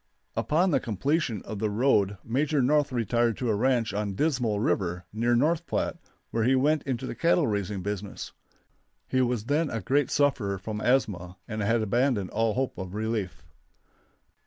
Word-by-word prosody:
Upon 175 +5 +2
the - - +3
completion 120 - -1
of 110 -2 -6
the 110 0 0
road 105 -3 +2
Major 140 +5 0
North 145 +2 +2
retired 115 -1 +1
to 125 - -1
a - - +1
ranch 120 -1 +1
on 100 -1 -2
Dismal 125 -6 +1
River, 90 -4 -1
near 120 +2 +2
North 160 +6 +1
Platte, - - -1 0.3
where 115 - 0
he 130 +3 +4
went 145 +3 +2
into 130 -1 -2
the - - -4
cattle 170 -1 +2
raising 100 -3 -2
business. 100 0 -5 0.8
He 130 - +1
was 120 -3 0
then 150 +4 +1
a 115 - -2
great 135 +8 +1
sufferer 120 -9 +1
from 105 +2 -5
asthma, 95 -8 0
and 110 -2 -4
had 110 +2 +2
abandoned 120 -3 +1
all 110 0 +1
hope 130 -3 -2
of 95 +1 -6
relief. 105 - -3
115 Hz, 170 wpm, -27 LUFS, 105-135 Hz, 0.8 s, he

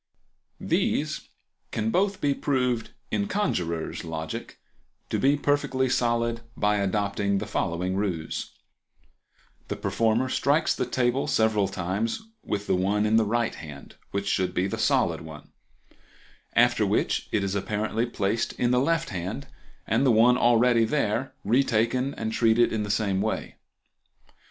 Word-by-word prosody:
These - - -1 0.4
can 110 0 -1
both 195 - +1
be 140 -1 +2
proved, 125 -5 0 0.2
in 100 -1 0
conjurer's 85 - -2
logic, 80 -1 -6 0.5
to - - 0
be 140 +2 +3
perfectly 140 -2 +1
solid 115 -1 +1 0.2
by 105 0 +2
adopting 100 0 0
the - - -2
following 90 +3 -1
ruse:— 95 -6 -2 1.2
The - - -3
performer 115 +3 +1
strikes 145 +4 +2
the - - -2
table 125 +1 0
several 110 -3 +2
times 100 - -2 0.2
with 100 0 -3
the - - +1
one 100 +3 +1
in 110 +1 +3
the 110 - +3
right 115 +2 0
hand, 75 -3 -10 0.2
which 100 0 -3
should 95 -2 0
be 90 - +1
the 95 - -3
solid - - +2
one, 80 -2 -11 1.0
after - - +4
which - - 0
it 105 - +1
is 100 -1 -1
apparently 105 +3 -1
placed 110 0 -1
in 120 0 0
the 125 - +4
left 165 +4 +1
hand, 95 +9 -4 0.4
and - - +1
the 135 - +4
one 115 +3 +5
already 120 -1 +4
there 125 +1 -1 0.3
taken 125 +4 +1
and 110 0 -3
treated 115 0 +3
in 110 - 0
the 105 - -4
same 100 -2 +1
way. - - -3
110 Hz, 145 wpm, -26 LUFS, 100-125 Hz, 1.2 s, one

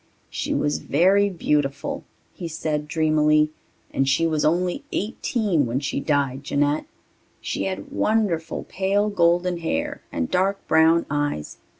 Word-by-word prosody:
"She - - -3
was 75 +1 0
very 190 - +3
beautiful," 150 -6 -1 0.3
he 175 - -6
said 150 -2 -3
dreamily, 155 -1 +3 0.4
"and 135 0 +1
she 140 +5 +2
was 155 -2 0
only 180 - +1
eighteen 205 - 0
when 120 +3 -1
she 140 -1 -2
died, 140 -2 0
Jeanette. 145 +1 0 0.5
She 95 - -3
had 95 +1 -4
wonderful 185 -7 0
pale 200 +2 0
golden 175 -1 +2
hair 120 - -2
and 80 -1 -2
dark 195 +2 0
brown 160 +1 +4
eyes. 145 - -2
160 Hz, 130 wpm, -23 LUFS, 145-180 Hz, 0.5 s, brown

